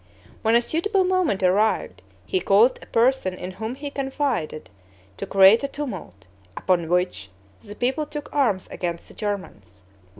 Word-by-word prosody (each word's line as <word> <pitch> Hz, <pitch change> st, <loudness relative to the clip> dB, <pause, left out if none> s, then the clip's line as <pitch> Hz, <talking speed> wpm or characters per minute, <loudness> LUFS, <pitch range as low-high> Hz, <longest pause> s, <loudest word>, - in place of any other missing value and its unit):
When 225 Hz, +1 st, +3 dB
a 240 Hz, -, +4 dB
suitable 380 Hz, -, 0 dB
moment 365 Hz, -, +1 dB
arrived, 185 Hz, -, +1 dB, 0.2 s
he 185 Hz, -, 0 dB
caused 210 Hz, +7 st, +4 dB
a -, -, -13 dB
person 230 Hz, -5 st, +2 dB
in 185 Hz, 0 st, -7 dB
whom 220 Hz, +6 st, -5 dB
he 285 Hz, +1 st, -6 dB
confided 270 Hz, -, -3 dB, 0.5 s
to -, -, -5 dB
create 195 Hz, +5 st, +6 dB
a -, -, 0 dB
tumult, 190 Hz, -, -7 dB, 0.3 s
upon 175 Hz, -3 st, 0 dB
which 180 Hz, -, 0 dB, 0.3 s
the 205 Hz, -, -10 dB
people 265 Hz, +6 st, -1 dB
took 295 Hz, 0 st, -6 dB
arms 220 Hz, -10 st, +1 dB
against 170 Hz, -1 st, -5 dB
the -, -, -14 dB
Germans. 100 Hz, -, -6 dB
210 Hz, 155 wpm, -23 LUFS, 180-275 Hz, 0.5 s, create